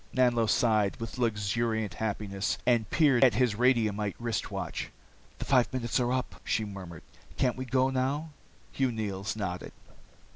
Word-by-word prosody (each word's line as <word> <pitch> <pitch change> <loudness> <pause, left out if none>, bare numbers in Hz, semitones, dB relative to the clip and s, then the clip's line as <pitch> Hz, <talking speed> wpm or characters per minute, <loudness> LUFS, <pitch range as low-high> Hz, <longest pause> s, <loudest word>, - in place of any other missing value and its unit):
Nanlo 120 -3 +3
sighed, 105 -2 +2
with 115 +2 -6
luxuriant 110 -1 0
happiness, 100 -2 -2
and 120 -3 +2
peered 140 -6 +4
at 125 -5 +5
his 125 -2 +3
radiumite 110 -4 +1
wrist 115 -2 -2
watch. - - -4 0.5
"The - - -5
five 125 -3 +3
minutes 125 -1 -1
are 120 0 +1
up," 130 0 -3
she 110 - 0
murmured. 95 -5 -9 0.3
"Can't 125 -2 +1
we 130 - -5
go 130 +1 +2
now?" 140 +5 -1 0.4
Hugh 130 -2 0
Neils 105 -2 -3
nodded. 90 -5 -4
115 Hz, 150 wpm, -29 LUFS, 105-130 Hz, 0.5 s, at